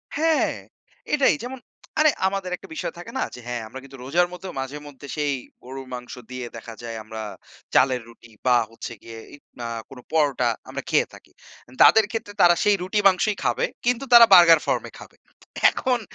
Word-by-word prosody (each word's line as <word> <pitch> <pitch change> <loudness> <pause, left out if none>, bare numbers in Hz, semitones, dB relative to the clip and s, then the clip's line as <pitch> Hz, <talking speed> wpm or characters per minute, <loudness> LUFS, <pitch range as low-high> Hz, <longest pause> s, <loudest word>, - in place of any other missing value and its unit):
হ্যা, 320 +2 +3 0.8
এটাই। 285 -2 +4
যেমন, 255 +1 -6 0.4
আরে 310 0 +6 0.2
আমাদের 195 -2 -3
একটা - - -14
বিষয় - - -4
থাকে 175 - -9
না? - - +1
যে - - -10
হ্যা, 120 0 -3
আমরা 130 +4 -9
কিন্তু 135 0 -13
রোজার 175 +7 +2
মধ্যেও, 180 +1 -8
মাঝে-মধ্যে 145 +1 -8
সেই 145 -1 0 0.3
গরুর 135 +1 -8
মাংস 125 0 -7 0.2
দিয়ে 125 -1 -5
দেখা 115 0 -9
যায় 115 -1 -5
আমরা 110 0 -7 0.5
চালের 130 -2 +4
রুটি 115 0 -17 0.2
বা 125 -1 +5
হচ্ছে 115 - -8
গিয়ে 115 -1 -10 0.2
ইক 145 - -22 0.2
না, 120 - -5 0.5
পরোটা 140 -6 +2 0.2
আমরা - - -5
খেয়ে - - +3
থাকি। - - -16 0.5
তাদের 220 -1 +7
ক্ষেত্রে 225 -2 -5
তারা 175 0 +7
সেই 205 -1 +4
রুটি 190 +3 -1
মাংসই 195 +2 +2
খাবে, - - +1 0.2
কিন্তু 245 +2 +1
তারা 235 -1 +11
বার্গার 170 -3 +9
ফর্ম - - 0
এ - - -20
খাবে। - - -14 0.5
এখন 250 -2 -1
150 Hz, 180 wpm, -23 LUFS, 125-205 Hz, 0.8 s, তারা